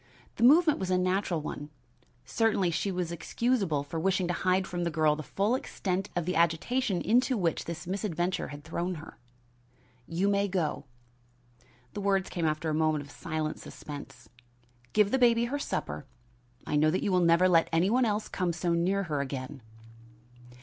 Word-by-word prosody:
The 230 - 0
movement 305 +4 +6
was 190 - -3
a 185 - +3
natural 185 -2 0
one. 145 0 -6 0.6
Certainly 210 -6 +1
she 195 +4 -1
was 180 -2 -2
excusable 190 - 0
for 160 +3 -5
wishing 190 +1 +1
to - - +1
hide 185 +1 +1
from 175 -1 -3
the 170 - 0
girl 155 -2 +2
the 155 - -5
full 200 - 0
extent 195 -6 -2
of 175 -2 -1
the 180 - -1
agitation 175 +6 +1
into 250 +2 +3
which 170 -5 0
this 170 +1 -6
misadventure 185 -1 -2
had 145 0 -9
thrown 175 +3 -3
her. 160 0 -11 0.9
"You 175 +4 0
may 200 0 +2
go." 180 -5 -2 1.1
The 205 - -4
words 195 -1 +1
came 170 -3 0
after 155 +1 -1
a - - -1
moment 155 -1 +1
of 140 - -14
silent 155 -1 -4
suspense. 135 -5 -10 0.7
"Give 210 -1 +4
the 265 - +2
baby 235 -1 +4
her 280 +4 -2
supper 75 - -4 0.6
I 150 - 0
know 155 +1 +4
that 180 - 0
you 200 - 0
will 180 - +4
never 170 +1 +5
let 165 -2 +4
any 170 +5 +2
one 255 +2 +3
else 210 -1 -1
come 180 -2 -1
so 175 0 -1
near 185 +4 +1
her 150 -5 -2
again." 135 0 -5
180 Hz, 180 wpm, -29 LUFS, 160-200 Hz, 1.1 s, movement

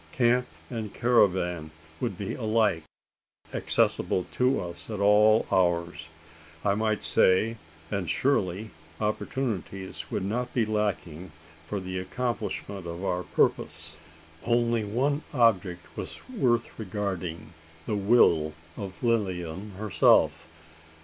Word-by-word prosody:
Camp 125 0 +3 0.2
and 110 -4 -4
caravan 90 -9 +2 0.3
would - - -2
be - - -4
alike 110 -7 +1 0.7
accessible 90 - +1
to 130 +2 +2
us 85 +1 -7
at 105 -2 -4
all 105 +2 +5
hours, 85 -3 +1 0.6
I 100 - +4
might 110 0 0
say 95 +8 +4 0.3
and 95 -5 -2
surely 105 -6 0 0.3
opportunities 105 -4 -3
would - - -2
not 125 +5 -2
be 120 -3 +3
lacking 95 -6 -2 0.4
for 100 - -2
the 95 0 -4
accomplishment 100 -2 -3
of 85 +2 -6
our 90 -1 0
purpose? - - -1 0.5
Only 120 -1 +2
one 135 +8 0
object 95 - +2
was - - -6
worth 130 - 0
regarding: 95 -5 -4 0.3
the 105 - -1
will 95 -7 +4 0.2
of 95 0 -7
Lilian 95 -4 -1
herself. 85 -5 +3
100 Hz, 110 wpm, -27 LUFS, 90-115 Hz, 0.7 s, all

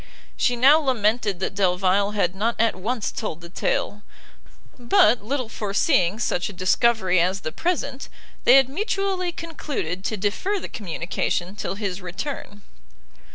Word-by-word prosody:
She 245 - +1
now 275 +6 +6
lamented 220 - 0
that - - -1
Delvile 195 +1 +2
had 180 -4 +1
not 220 +5 -1
at 230 0 +2
once 215 +4 -2
told 170 -7 -4
the 170 0 -11
tale, 205 +2 -1 0.8
but, 235 -2 +4
little 255 +2 -2
foreseeing 205 - +1
such 200 -5 -1
a - - -9
discovery 185 0 +2
as 185 +3 +1
the 155 - -4
present, 285 - -2 0.3
they 245 - +7
had 270 -2 +6
mutually 380 - -1
concluded 295 - -5
to 220 - -1
defer 225 - -1
the - - -7
communication 180 -2 -3
till 200 - -4
his 195 -2 -4
return. 205 +2 -6
210 Hz, 145 wpm, -23 LUFS, 190-260 Hz, 0.8 s, they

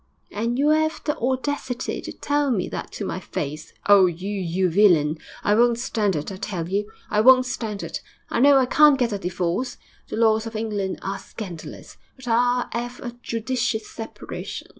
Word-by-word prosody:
'And 230 +4 -1
you 290 +3 +3
'ave 315 0 +2
the 295 - 0
audacity 260 0 -2
to - - -6
tell 290 -1 0
me 210 -8 0
that - - -6
to - - -4
my - - -3
face! 150 +3 -5 0.2
Oh, 200 -2 +7
you 180 +4 -4
you 185 -2 0
villain! 165 -5 +4 0.2
I 205 - +3
won't 235 +1 +4
stand 220 -6 0
it, 150 +5 -3
I 190 - -6
tell 180 -4 -4
you; 205 +3 -2 0.2
I 210 - +3
won't 255 +2 +7
stand 225 -5 -4
it. - - -5 0.3
I - - -1
know 280 +2 +7
I 265 - +4
can't 295 +2 +6
get 240 -4 0
a 200 - -2
divorce 180 +5 -2 0.3
the - - -5
laws 220 0 +3
of 225 - -8
England 210 -3 -2
are 195 +1 -3
scandalous 185 -5 -9 0.2
but 260 -2 -13
I'll 245 +1 +2
'ave 245 +1 -4
a 240 -1 -6
judicious 230 -2 -2
separation.... 225 -1 -7
220 Hz, 185 wpm, -23 LUFS, 195-250 Hz, 0.3 s, Oh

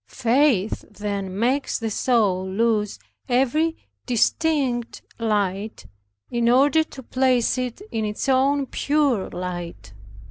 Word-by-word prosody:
Faith 240 -4 +1
then 200 -3 -4
makes 255 +6 0
the 225 -2 -3
soul 200 -6 +1
lose 210 0 0 0.3
every 270 +6 +1 0.3
distinct 250 0 0 0.2
light, 205 - -1 0.5
in 235 -1 +1
order 285 +6 +4
to 275 -4 -12
place 255 -1 +2
it 255 - -4
in 220 - -1
its 210 +5 -3
own 275 +1 +3
pure 280 -7 0
light. 175 - -6
235 Hz, 110 wpm, -23 LUFS, 210-270 Hz, 0.5 s, order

